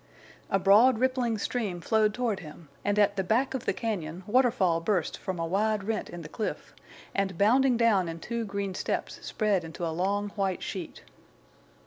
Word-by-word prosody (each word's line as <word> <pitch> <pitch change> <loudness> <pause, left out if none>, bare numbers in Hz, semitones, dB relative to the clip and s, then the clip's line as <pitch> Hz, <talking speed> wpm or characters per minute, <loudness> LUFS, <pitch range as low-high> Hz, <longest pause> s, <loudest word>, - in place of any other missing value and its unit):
A 195 - +3
broad 210 +6 +6
rippling 250 -2 +1
stream 205 -4 -2
flowed 215 +4 +2
toward 225 -2 -1
him, 155 -1 -12
and 205 0 0
at 205 -1 +3
the 190 - +1
back 235 +9 +1
of 265 - -4
the - - +2
cañon 185 -5 -4
waterfall 220 -7 +3
burst 180 -1 0
from 190 -3 -5
a 165 - -1
wide 205 +4 0
rent 215 +2 -2
in 175 -1 -8
the - - -7
cliff, 215 +7 -5 0.4
and, 195 -3 -1
bounding 245 +5 +4
down 210 -7 +3
in 165 0 -6
two 235 +5 -3
green 200 -2 -3
steps, - - -3
spread 205 -5 0
into 165 +1 -5
a 165 - -2
long 200 +4 0
white 195 -3 -2
sheet. 180 - -6
200 Hz, 180 wpm, -28 LUFS, 180-225 Hz, 0.4 s, broad